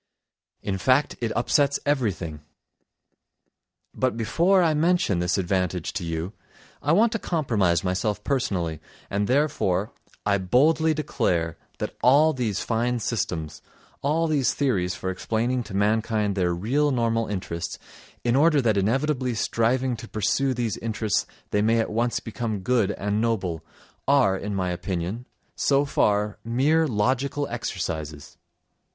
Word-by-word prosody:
In 95 -2 -2
fact, 130 +6 +2
it 115 -2 -1
upsets 140 +3 +2
everything. 100 - -1 1.5
But 130 -3 0
before 175 - +3
I 160 -2 +3
mention 165 - +2
this 90 +2 +1
advantage 90 -2 -1
to 90 - -3
you, 85 +3 -3 0.5
I 145 - +1
want 215 +7 +4
to 225 - -2
compromise 110 - +1
myself 100 +3 -1
personally, 90 - -1 0.3
and 100 +1 0
therefore 110 -8 +1 0.3
I 100 -1 +2
boldly 155 - +3
declare 85 - -1 0.2
that - - -4
all 150 +5 +5
these 115 -6 -2
fine 120 +2 0
systems, 80 -10 -3 0.4
all 155 +4 +1
these 150 -5 +1
theories 95 -11 0
for 95 - -3
explaining 115 +6 -1
to 95 - -7
mankind 105 0 +1
their 90 -2 +1
real 125 +12 +1
normal 115 -3 +1
interests, 90 -4 -4 0.5
in 120 0 +2
order 150 +1 +4
that 110 -5 +2
inevitably 125 +4 0
striving 120 +4 +1
to 115 0 -9
pursue 125 +6 0
these 115 -4 -2
interests 110 -2 -1 0.2
they 105 - +2
may 115 +2 +3
at 115 - -1
once 115 +2 0
become 110 -2 -4
good 110 0 +2
and 105 +2 -1
noble—are, 100 - 0
in 100 +1 -4
my 90 -2 -1
opinion, 90 +6 -4 0.3
so 140 0 +2
far, 105 -6 +1
mere 145 +8 +2
logical 130 +5 0
exercises! 80 -10 -5
115 Hz, 135 wpm, -25 LUFS, 95-135 Hz, 1.5 s, all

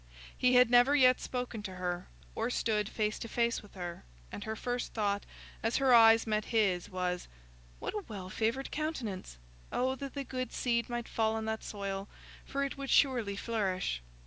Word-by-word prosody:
He 250 0 +3
had 250 -1 +6
never 245 +4 +6
yet 255 -3 +6
spoken 245 -3 -4
to 190 -2 -6
her, 180 0 -3 0.3
or 225 +2 -1
stood 215 -4 0
face 215 -1 -1
to - - -5
face 235 0 0
with 205 - -17
her, 175 -2 -6 0.3
and 205 - -6
her 220 0 -3
first 245 +2 -3
thought, 205 -2 0 0.3
as 225 +1 +1
her 270 -2 +4
eyes 225 -1 +8
met 215 -1 0
his, 195 -6 +1
was, 180 -1 -2 0.5
"What - - -4
a 420 -2 -3
well 190 -4 -7
favoured 230 +6 -1
countenance! 245 - -4 0.3
Oh 260 +1 +1
that 275 +1 -7
the 280 - -2
good 255 -2 -4
seed 235 -1 0
might 240 -1 -3
fall 220 -1 +1
on 220 0 -2
that 220 0 -2
soil, 200 -1 -4 0.3
for 275 0 -2
it 275 0 -4
would 275 -1 -4
surely 240 -8 +3
flourish." 195 - -1
225 Hz, 185 wpm, -32 LUFS, 200-250 Hz, 0.5 s, eyes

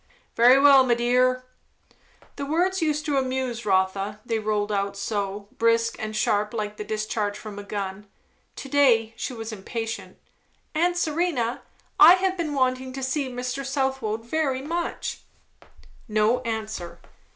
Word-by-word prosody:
"Very 245 +3 +7
well, 275 -1 +7
my 245 -2 +2
dear." 250 +1 +2 0.9
The 280 - -4
words 360 +5 +1
used 305 -1 0
to 290 -3 0
amuse 255 -3 -3
Rotha, 195 +2 +1
they 225 -2 -1
rolled 210 -1 -1
out 200 0 -1
so, 200 -1 -3
brisk 230 0 +2
and 215 0 -4
sharp, 210 +1 0
like 210 -1 -3
the - - -4
discharge 215 -1 -2
from 210 -2 -8
a - - -7
gun. 200 0 -5 0.5
To - - -7
day 245 -6 +3
she 240 - -4
was 225 -1 -6
impatient. 225 +2 -5 0.6
"Aunt 345 +3 +1
Serena, 305 -8 0 0.4
I 350 - +10
have 375 0 0
been 320 -5 -3
wanting 255 -1 0
to 270 0 -5
see 265 +1 -1
Mr. 250 +2 -4
Southwode 265 -5 -2
very 270 -1 -1
much." 335 +3 -3 0.9
No 215 +2 +2
answer. 220 -7 -5
240 Hz, 145 wpm, -25 LUFS, 215-270 Hz, 0.9 s, I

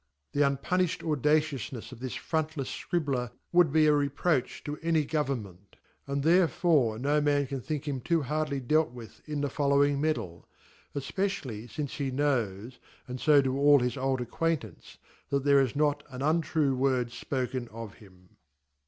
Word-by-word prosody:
TheunpunijUd 145 +6 +1
audacioufnefs 150 -5 0
of 125 - -10
'this 130 0 -5
front 155 -1 -2
Jefs 135 -3 -4
Scribkr 140 -8 -1 0.2
.would 175 -4 +5
be 155 +1 +4
a 150 - +5
reproach 145 0 0
to 150 +1 -5
any 160 -2 +1
Government; 115 - -3 0.3
and 140 0 -2
there 175 +3 +5
fore 145 -12 +2
no 145 +5 +1
wan 145 -1 +2
can 135 0 -5
think 150 +2 -4
him 135 -3 -2
too 165 +3 +1
hardly 150 0 -1
dealt 155 +5 +2
with 120 -2 -12
in 150 -1 -2
the 145 - +1
following 140 0 +2
Medal; 150 - -2 0.5
efpecially.fxnce 140 - -3
he 140 -2 -3
knows, 125 -5 -1 0.3
and 125 0 -6
fo 145 -2 +5
do 130 0 -1
all 145 0 +7
his 125 -1 0
old 130 -1 -1
acquain 165 +6 0
tance, 105 -7 -13 0.3
that 140 -1 0
thece 140 -1 +5
is 130 +1 -7
not 145 0 +1
an 130 0 -6
untrue 155 -2 +1
wordfpoken 125 -1 -1
of 115 -2 -8
him. 95 -3 -19
140 Hz, 160 wpm, -29 LUFS, 125-150 Hz, 0.5 s, all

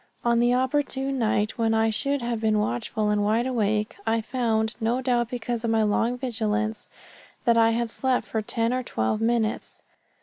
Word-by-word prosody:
On 235 0 +3
the 240 +1 +3
opportune 270 0 0
night, 215 0 0
when 225 -1 +2
I 220 0 +2
should 280 +4 -1
have 235 -2 -2
been 215 -1 +2
watchful 210 - -1
and 205 0 +1
wide 220 +4 +1
awake, 215 -4 0
I 225 +1 +2
found, 220 -1 -1
no 230 +3 +1
doubt 245 -2 0
because 240 -1 -3
of 230 - 0
my 225 -1 +3
long 225 +4 +1
vigilance, 220 -3 -2 0.6
that 235 -2 +4
I 225 0 +5
had 230 0 -1
slept 260 0 0
for 220 - -2
ten 230 +2 -1
or 255 - 0
twelve 160 - -1
minutes. 225 -1 -1
230 Hz, 180 wpm, -25 LUFS, 220-245 Hz, 0.6 s, I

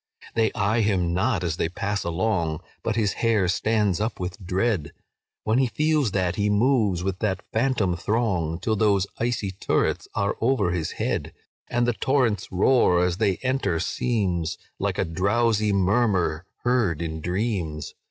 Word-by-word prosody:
"They 110 -1 +2
eye 105 +3 +1
him 95 -5 +1
not 95 +1 +1
as 85 -2 -1
they 80 - 0
pass 100 +3 -2
along, 85 -3 -1 0.2
But - - -1
his 105 -3 +1
hair 110 -5 +3
stands 105 0 +1
up 110 +2 -2
with 90 +1 -5
dread, 95 -3 -1 0.5
When 110 +4 +2
he 130 - +3
feels 150 0 +1
that 95 -2 -1
he 105 0 +1
moves 105 -4 +2
with 95 0 -2
that 95 -3 -1
phantom 110 -6 +1
throng, 90 -5 0
Till 110 +2 0
those 100 -3 +2
icy 115 -4 -1
turrets 95 - -1
are 100 0 0
over 120 -6 +2
his 85 -3 -2
head, - - -2 0.3
And 120 0 +1
the 120 - +2
torrent's 115 -3 0
roar, 90 -2 +4
as 90 -1 -1
they 100 -4 +1
enter, 130 -10 0
seems 90 -7 -1 0.2
Like - - -1
a - - +1
drowsy 105 +5 +1
murmur 95 -4 +1 0.2
heard 120 -10 +1
in 80 -1 -4
dreams. 90 - -2
100 Hz, 160 wpm, -24 LUFS, 90-115 Hz, 0.5 s, roar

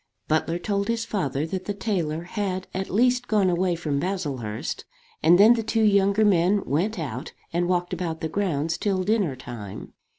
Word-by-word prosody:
Butler 160 +2 +1
told 200 +2 -1
his 230 -1 -1
father 150 - -1
that 185 +3 -4
the 205 - -3
tailor 175 -6 -2
had 185 0 -3
at 190 +1 -3
least 245 +4 +2
gone 200 -4 +3
away 175 0 +1
from 150 -4 -2
Baslehurst; 140 - -3 0.4
and 170 +3 +6
then 215 +5 +8
the 235 - -1
two 225 0 0
younger 200 0 +4
men 195 +1 +3
went 190 +10 0
out 130 -6 -5 0.2
and 175 +1 +1
walked 180 0 0
about 170 -2 -3
the 160 - -2
grounds 160 -3 -1
till 195 -3 0
dinner 200 -8 +1
time. 120 -6 -8
185 Hz, 175 wpm, -25 LUFS, 160-205 Hz, 0.4 s, then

